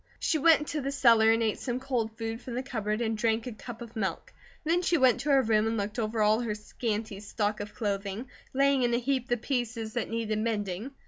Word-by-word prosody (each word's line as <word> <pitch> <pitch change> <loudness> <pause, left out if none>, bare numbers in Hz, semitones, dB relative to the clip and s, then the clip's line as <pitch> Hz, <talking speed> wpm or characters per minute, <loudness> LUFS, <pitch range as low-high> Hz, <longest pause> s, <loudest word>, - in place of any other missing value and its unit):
She 315 - +1
went 320 0 +6
into 300 0 -3
the 275 +1 -2
cellar 230 -5 +5
and 225 0 +2
ate 220 -2 0
some 250 -1 -2
cold 235 -5 -2
food 225 +1 -4
from 245 - -6
the 255 - -2
cupboard 220 -4 -2
and 225 -1 0
drank 225 0 0
a 250 - -4
cup 235 +2 -8
of 235 0 -12
milk. 200 -4 -3 0.3
Then 335 +3 +2
she 345 -1 +2
went 260 -4 +4
to 295 - -3
her 270 -2 +5
room 220 -1 +2
and 225 0 -1
looked 210 +3 -3
over 220 0 0
all 215 +1 +4
of 240 - -2
her 210 - -1
scanty 210 -1 -4
stock 210 0 -2
of 205 0 -7
clothing, 200 +2 -3 0.2
laying 275 0 +3
in 240 -1 +2
a - - +3
heap 255 0 -1
the 240 - +1
pieces 230 -3 -3
that 240 - -2
needed 225 -2 -1
mending. 210 0 -2
230 Hz, 240 wpm, -29 LUFS, 215-255 Hz, 0.3 s, went